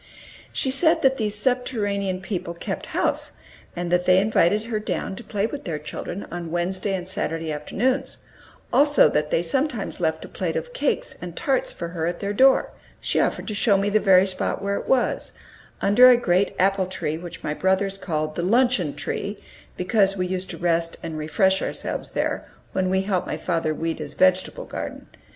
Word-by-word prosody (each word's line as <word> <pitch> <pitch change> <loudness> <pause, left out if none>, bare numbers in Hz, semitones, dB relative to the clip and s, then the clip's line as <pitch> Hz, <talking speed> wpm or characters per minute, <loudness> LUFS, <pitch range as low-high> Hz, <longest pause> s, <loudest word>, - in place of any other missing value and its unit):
She 265 - 0
said 320 +4 +4
that 265 0 +4
these 210 -4 -1
subterranean 205 -5 -1
people 180 -3 -4
kept - - -5
house, - - 0 0.4
and 175 0 -3
that 180 0 +2
they 185 0 +5
invited 205 0 +2
her 225 -2 -2
down 210 -2 -3
to 240 - -9
play 205 -2 -1
with 280 +5 -5
their 165 -4 -3
children 165 +5 -6
on 170 -1 -5
Wednesday 185 +4 -1
and 180 -1 -4
Saturday 165 -5 0
afternoons; 255 - -1 0.6
also 290 0 +6
that 150 0 0
they 165 - +1
sometimes 245 - -1
left 160 -2 -1
a - - -9
plate - - -3
of - - -4
cakes - - -1
and 175 -2 -7
tarts 265 -2 0
for 170 - -6
her 165 -1 -2
at 175 0 -3
their 200 0 -2
door: 265 +5 +4 0.3
she - - 0
offered - - 0
to 215 - -2
show 205 -1 +3
me 200 +1 0
the 215 - +4
very 190 -2 +5
spot 185 -1 -2
where 200 0 -1
it - - -6
was, 260 -2 +1 0.5
under 245 +6 +7
a 250 - +7
great 190 -4 +1
apple 195 0 +2
tree 160 -4 -3
which 175 0 -9
my 150 - -1
brothers 190 +3 0
called 155 -4 -2
"the - - -1
luncheon 215 - +2
tree," 205 +1 -3 0.4
because 195 +1 +2
we 185 - 0
used 185 0 -3
to - - -4
rest 165 -1 0
and 165 -1 -5
refresh 190 +5 +2
ourselves - - -4
there, - - -2 0.2
when 185 -1 0
we 190 0 +2
helped 190 -2 -1
my - - -3
father 165 -3 -1
weed 165 +1 -3
his 150 -2 -6
vegetable 185 - +2
garden. - - -6
190 Hz, 190 wpm, -24 LUFS, 175-215 Hz, 0.6 s, under